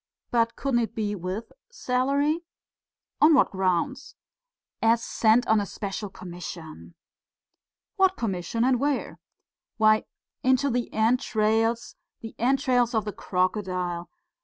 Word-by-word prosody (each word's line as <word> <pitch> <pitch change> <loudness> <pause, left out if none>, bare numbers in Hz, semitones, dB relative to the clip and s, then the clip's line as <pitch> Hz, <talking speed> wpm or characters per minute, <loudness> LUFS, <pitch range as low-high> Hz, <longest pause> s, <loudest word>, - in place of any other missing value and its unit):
"But 230 -1 +2
couldn't 270 -3 0
it 230 -2 -2
be 210 -2 -1
with 190 +4 -5 0.2
salary?" 280 - 0 0.8
"On 305 +1 +7
what 265 - +4
grounds?" 190 +9 -1 0.7
"As 230 +1 +3
sent 225 +2 +3
on 220 -1 +4
a - - -2
special 205 0 -5
commission." 170 - -9 1.0
"What 380 -1 +3
commission 200 +1 -2
and 255 -1 +3
where?" 285 +1 -1 0.6
"Why, 215 -1 +4 0.4
into 260 +2 +2
the 245 0 -2
entrails, 225 0 +1 0.2
the 225 - -8
entrails 250 -1 +2
of 220 - +1
the 210 - -4
crocodile.... 180 -2 -2
225 Hz, 115 wpm, -26 LUFS, 195-255 Hz, 1.0 s, On